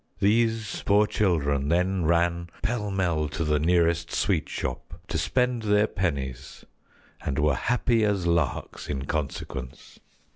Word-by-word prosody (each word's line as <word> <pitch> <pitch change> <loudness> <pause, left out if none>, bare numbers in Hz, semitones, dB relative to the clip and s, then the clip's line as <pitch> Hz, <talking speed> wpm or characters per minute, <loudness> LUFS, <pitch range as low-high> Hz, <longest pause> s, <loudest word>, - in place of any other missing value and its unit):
These 110 +1 +1
poor 105 +1 +5
children 75 -10 +1
then 90 +1 +1
ran 85 +1 +1
pell 110 -2 -1
mell 85 -6 0
to 85 - -3
the 75 -1 +1
nearest 85 +1 +2
sweet - - 0
shop - - -5
to - - -1
spend 125 -2 +1
their 105 -1 +3
pennies 70 - -4 0.6
and 70 - -2
were 75 -1 +3
happy 120 - +1
as 100 -4 +1
larks 85 -4 -1
in 70 -2 -3
consequence." 70 -4 -5
85 Hz, 135 wpm, -26 LUFS, 75-105 Hz, 0.6 s, poor